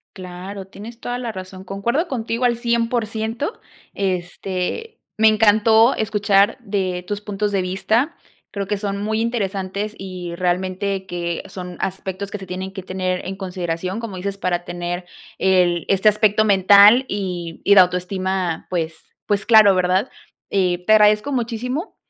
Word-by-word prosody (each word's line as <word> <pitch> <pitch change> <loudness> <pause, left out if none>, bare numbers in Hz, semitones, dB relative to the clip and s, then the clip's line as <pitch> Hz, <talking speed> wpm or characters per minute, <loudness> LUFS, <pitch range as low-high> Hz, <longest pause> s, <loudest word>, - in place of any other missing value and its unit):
Claro, 185 +1 -8
tienes 225 +4 -11
toda 245 0 -4
la 235 -3 -4
razón. 185 0 -9
Concuerdo 235 - -1
contigo 235 -3 -3
al 240 -1 +3
100%, 230 - -1 0.4
este, 190 - -3 0.2
me 220 - +5
encantó 220 +2 +5
escuchar 205 0 +2
de 190 -5 -2
tus 205 +2 -4
puntos 205 0 -2
de 195 -2 0
vista. 220 - 0 0.4
Creo 200 -2 -4
que 205 - -1
son 200 0 -3
muy 220 +1 -1
interesantes 205 -3 -2
y 180 -3 -6
realmente, 190 +2 -1
que 170 -1 -3
son 180 -2 -8
aspectos 190 +1 -4
que 210 - -5
se 190 - -9
tienen 185 +1 -5
que 190 -2 -8
tener 185 -1 -2
en 190 - -4
consideración, 185 0 -4
como 230 -4 -6
dices, 195 +2 -4
para 175 -2 -1
tener 175 +1 -4 0.3
el 180 -3 +2
este 195 +2 +4
aspecto 215 0 +3
mental 205 +5 +6
y 180 -4 -4
y 200 - +6
la 190 - +9
autoestima. 180 -1 -2
Pues 165 -3 -2 0.3
pues 200 -1 0
claro, 215 -4 +7
¿verdad? 185 +5 +1 0.4
Eh, 180 -2 0
te 215 - +4
agradezco 210 +5 +4
muchísimo, 250 - -3
195 Hz, 150 wpm, -21 LUFS, 185-220 Hz, 0.4 s, la